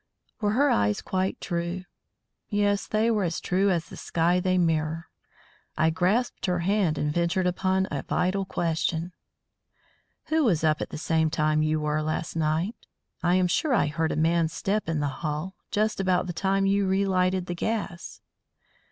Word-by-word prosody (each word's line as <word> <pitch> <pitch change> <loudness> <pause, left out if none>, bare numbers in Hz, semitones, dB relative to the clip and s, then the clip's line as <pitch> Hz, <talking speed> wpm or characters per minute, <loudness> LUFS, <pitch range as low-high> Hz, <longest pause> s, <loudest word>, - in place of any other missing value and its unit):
Were 210 -1 +1
her 280 +5 +3
eyes 105 0 +2
quite 190 0 -2
true? 175 +1 -3 0.7
Yes, 205 -1 +1
they 220 +2 +2
were 210 -3 +1
as 170 -2 -1
true 190 +2 +1
as 170 -3 0
the - - -11
sky 170 +2 +1
they 185 0 +1
mirror. 160 -1 0 0.7
I 160 +1 +3
grasped 195 +9 0
her 180 -1 0
hand 185 -4 +1
and 150 0 -1
ventured 175 +2 +1
upon 190 +1 +1
a 140 - -2
vital 190 +2 0
question. 165 -1 -1 1.2
"Who 315 0 +3
was 175 - +2
up 155 -1 +2
at - - -3
the - - -6
same 160 0 +1
time 155 -1 +1
you 155 0 +1
were 150 0 0
last 155 +1 -3
night? 165 +7 -1 0.3
I 175 +1 +3
am 185 0 +3
sure 250 - +1
I - - +3
heard 160 +2 -1
a - - -1
man's 165 0 +2
step 205 -2 -1
in 160 -2 0
the 145 - 0
hall, 155 +4 -3 0.2
just 215 0 0
about 185 -2 +2
the 175 - -4
time 195 +2 +1
you 200 0 +2
relighted 190 -1 +1
the 175 - -3
gas." 185 -2 -4
180 Hz, 175 wpm, -26 LUFS, 160-195 Hz, 1.2 s, her